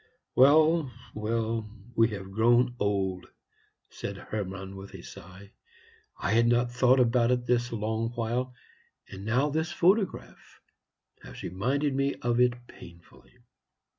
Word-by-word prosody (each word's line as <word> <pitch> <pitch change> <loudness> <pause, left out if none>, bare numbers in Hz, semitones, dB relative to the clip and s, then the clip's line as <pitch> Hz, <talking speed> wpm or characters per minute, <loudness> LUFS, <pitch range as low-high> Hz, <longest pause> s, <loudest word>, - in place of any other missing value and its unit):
"Well, 155 +2 +5 0.2
well, 110 0 -2 0.3
we 115 0 +4
have 95 -3 -7
grown 120 +4 +3
old," 95 -3 -1 0.6
said - - -6
Hermann, 95 -2 -6
with 95 0 -10
a - - -10
sigh. 95 +2 -12 0.7
"I - - -2
had 115 +1 +4
not 120 0 +2
thought 125 +1 +4
about 120 -1 +3
it 125 -1 +1
this 120 0 +1
long 110 0 -2
while; 120 +2 -2 0.6
and 95 0 -8
now 125 +7 +1
this 160 +3 -1
photograph 190 +3 0 0.6
has - - -11
reminded 135 - -1
me 140 +1 0
of 120 0 -1
it 120 0 +2
painfully." 85 +6 -16
120 Hz, 130 wpm, -28 LUFS, 105-125 Hz, 0.7 s, Well